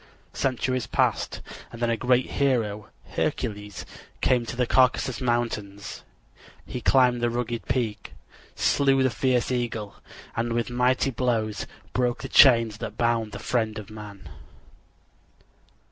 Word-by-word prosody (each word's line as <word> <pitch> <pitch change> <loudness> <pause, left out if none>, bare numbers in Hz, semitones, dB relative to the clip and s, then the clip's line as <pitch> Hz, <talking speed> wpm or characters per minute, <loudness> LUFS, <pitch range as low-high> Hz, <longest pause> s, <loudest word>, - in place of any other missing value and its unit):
Centuries 130 -2 -1
passed - - 0 0.3
and 115 - -10
then 120 -1 +1
a - - +2
great 125 +1 +2
hero, 115 -7 0 0.2
Hercules, 105 -1 -3 0.3
came 120 -2 +2
to - - -5
the 125 0 +1
Caucasus 130 0 +2
Mountains. 115 -5 -2 0.6
He 125 - -6
climbed 125 -2 +4
the 120 - +2
rugged 120 -1 -3
peak, 115 -5 -2 0.4
slew 135 -1 +3
the 130 - +2
fierce 125 +2 +1
eagle, 115 -4 -2 0.4
and 115 0 -1
with 120 +1 -1
mighty 125 +2 +2
blows 115 -4 -1 0.3
broke 125 0 0
the 135 - -5
chains 115 -7 +6
that 105 - -6
bound 115 -2 +1
the - - -6
friend 110 -3 -1
of 105 0 -8
man. 105 -5 -10
120 Hz, 130 wpm, -25 LUFS, 110-125 Hz, 0.6 s, chains